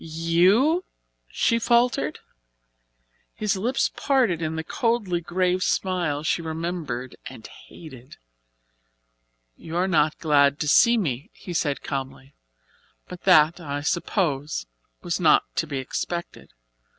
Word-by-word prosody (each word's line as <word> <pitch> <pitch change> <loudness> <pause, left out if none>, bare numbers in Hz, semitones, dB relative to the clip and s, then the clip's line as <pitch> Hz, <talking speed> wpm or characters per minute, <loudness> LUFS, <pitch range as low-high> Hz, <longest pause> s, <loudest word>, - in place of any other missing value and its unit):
"You?" 180 - +2 0.5
she 230 -1 +1
faltered. 235 - +1 1.1
His 210 -2 -1
lips 240 +8 0
parted 250 - +1
in 160 0 -2
the 160 - -3
coldly 220 -6 -1
grave 180 +1 0
smile 175 -7 -1
she 165 - 0
remembered 160 -6 -4
and 110 - -11
hated. 135 -5 -13 1.4
"You 165 - -9
are 185 +2 +1
not 155 -4 +2
glad 145 -2 +3
to 150 - -1
see 235 +10 +5
me," 150 - -3
he 180 - -8
said 145 -4 -1
calmly, 135 0 -6 0.7
"but 180 -1 -11
that, 165 -2 +5
I 145 -3 -4
suppose, 150 - -1 0.4
was - - -2
not - - +5
to - - 0
be 140 - -4
expected. 170 +6 -5
165 Hz, 120 wpm, -24 LUFS, 150-190 Hz, 1.4 s, see